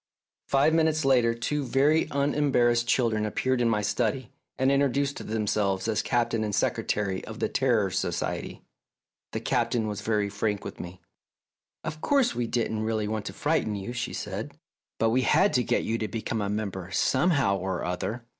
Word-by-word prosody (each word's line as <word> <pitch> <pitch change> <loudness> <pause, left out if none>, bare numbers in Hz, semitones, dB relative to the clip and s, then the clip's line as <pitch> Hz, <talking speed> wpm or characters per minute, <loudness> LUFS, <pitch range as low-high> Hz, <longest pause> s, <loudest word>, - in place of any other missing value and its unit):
Five 140 +3 +3
minutes 160 -2 +2
later 120 -4 +4
two 145 +5 -2
very 140 +5 +2
unembarrassed 135 -5 +2
children 115 -4 +2
appeared 125 +4 0
in 120 - +3
my 105 -2 +1
study, 115 +4 -1 0.3
and 130 +1 +3
intro 140 0 +4
duced 140 +2 -1
themselves 105 -2 0
as 110 -2 +1
Captain 115 -2 0
and 105 -2 -1
Secretary 95 -3 -1
of - - -8
the - - 0
Terror - - +1
Society. - - -3 0.7
The - - -3
Captain 115 -3 0
was 105 -1 -4
very 105 -1 0
frank 105 0 -2
with - - -7
me. 90 +1 -8 0.8
"Of 155 0 -5
course, 275 -4 +2
we 120 -1 -2
didn't 115 -2 -1
really 110 -1 -1
want 110 -1 -3
to - - -5
frighten 145 -8 0
you," 100 +4 -5
she 120 0 -3
said, - - -5 0.4
"but 115 +1 +2
we 130 +3 +3
had 190 - +3
to 125 - +3
get - - 0
you 115 +1 -1
to 110 - -2
become 110 0 -3
a 100 - -1
member 100 -3 -3
somehow 130 - +2
or 95 -1 -3
other." 110 +7 -3
115 Hz, 175 wpm, -27 LUFS, 105-135 Hz, 0.8 s, later